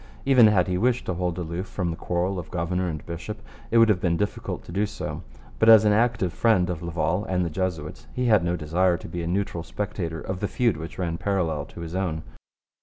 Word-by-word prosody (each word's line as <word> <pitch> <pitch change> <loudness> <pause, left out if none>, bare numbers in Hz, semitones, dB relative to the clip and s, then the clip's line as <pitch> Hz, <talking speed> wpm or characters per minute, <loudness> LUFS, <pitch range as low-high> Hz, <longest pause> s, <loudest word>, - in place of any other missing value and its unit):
Even 130 -5 +7
had 100 -4 +4
he 90 -1 0
wished 125 +2 +1
to 95 - -1
hold 90 -1 -2
aloof 90 +2 -4
from 90 -3 -2
the - - -4
quarrel 90 +2 -1
of 80 -3 -8
governor 90 +1 -1
and 75 -3 -6
bishop, 85 +6 -6 0.3
it 115 - +3
would 115 0 +7
have 100 -4 +2
been 85 -3 +1
difficult 105 +2 -3
to - - -11
do 100 +4 0
so. 105 - -5 0.4
But 110 - +5
as 110 -1 +9
an 105 - +5
active 110 -5 +1
friend 95 -6 +3
of 85 - -5
Laval 85 +3 -1
and 90 -3 0
the 85 - -3
Jesuits 80 -3 -3
he 125 - -2
had 105 -6 +4
no 85 0 0
desire 85 +3 +1
to - - -10
be 85 +1 -4
a 85 - -3
neutral 90 -1 -1
spectator 85 -3 -4
of 95 +2 -4
the 105 - -1
feud 120 -2 +1
which 80 +1 -8
ran 85 -2 -2
parallel 85 -7 -1
with - - -18
his 80 0 -7
own. 90 -4 -2
90 Hz, 235 wpm, -25 LUFS, 85-105 Hz, 0.4 s, as